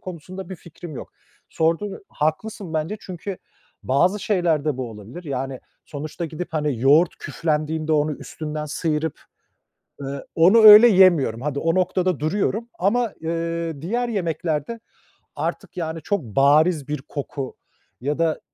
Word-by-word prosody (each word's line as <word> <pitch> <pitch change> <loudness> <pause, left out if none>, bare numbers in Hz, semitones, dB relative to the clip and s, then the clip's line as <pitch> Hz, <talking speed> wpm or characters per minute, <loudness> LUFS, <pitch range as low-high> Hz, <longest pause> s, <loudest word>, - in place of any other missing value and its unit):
konusunda 185 +1 -8
bir 190 - -7
fikrim 170 -1 -11
yok. - - -9 0.4
Sordun, 165 +5 -1
haklısın 170 +4 -3
bence 160 +7 -1
çünkü 185 +1 -7 0.4
bazı 180 +10 +2
şeyler 175 -8 +1
de 150 -4 0
bu 130 -3 -4
olabilir. 110 - -10
Yani, 135 -2 -4 0.2
sonuçta 155 +4 -6
gidip 165 +2 -5
hani 150 -6 -1
yoğurt 150 +7 +5
küflendiğinde 155 0 -2
onu 150 0 +2
üstünden 150 +1 -6
sıyırıp, 155 0 -2 0.8
ııı, 140 0 -6
onu 180 +7 +6
öyle 215 +2 +11
yemiyorum. 175 - +4
Hadi, 140 0 -2
o 165 +2 +1
noktada 185 -2 +1
duruyorum 205 +8 -1
ama, 225 +4 +1
ııı, 165 -2 -3
diğer 235 +9 -1
yemeklerde 170 0 -2 0.6
artık - - -4
yani 165 -2 -3
çok 200 -4 -1
bariz 145 - +3
bir 150 -2 -3
koku 140 -2 -5 0.4
ya 145 +5 -2
da 165 -1 +1
160 Hz, 135 wpm, -22 LUFS, 150-185 Hz, 0.8 s, öyle